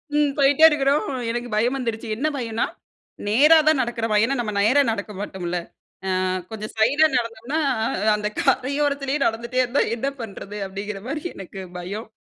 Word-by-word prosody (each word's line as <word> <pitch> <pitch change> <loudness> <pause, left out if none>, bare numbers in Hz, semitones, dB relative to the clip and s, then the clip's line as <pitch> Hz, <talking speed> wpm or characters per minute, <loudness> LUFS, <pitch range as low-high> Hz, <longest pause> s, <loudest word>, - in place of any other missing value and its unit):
ம் 295 -1 +3
போயிட்டே 285 +3 +6
இருக்றோம் 285 0 +1 0.3
எனக்கு 240 0 -4
பயம் 240 +5 +2
வந்துருச்சு. 230 -2 -3
என்ன 290 +7 -1
பயம்னா 230 -2 -1 0.6
நேரா 295 +10 +6
தான் 310 -3 +5
நடக்கிறோமா? 230 -2 -1
ஏன்னா 270 +4 +1
நம்ம 215 -3 -2
நேரா 245 +8 +4
நடக்க 210 0 -4
மாட்டோம்ல. 180 -3 -4 0.6
அ - - 0 0.3
கொஞ்சம் 215 -1 -6
சைடுல 280 +8 +4
நடந்தோம்னா 235 +6 -2 0.6
அந்த 210 0 -2
கரையோரத்திலயே 280 +1 +1
நடந்துகிட்டே 235 +3 0
இருந்தா, 250 +3 +1
என்ன 270 +4 -1
பண்றது? 205 -1 -7
அப்டிங்கிற 195 +1 -6
மாதிரி 295 +2 -4
எனக்கு 195 0 -8 0.2
பயம். 200 +6 -6
235 Hz, 145 wpm, -23 LUFS, 215-280 Hz, 0.6 s, போயிட்டே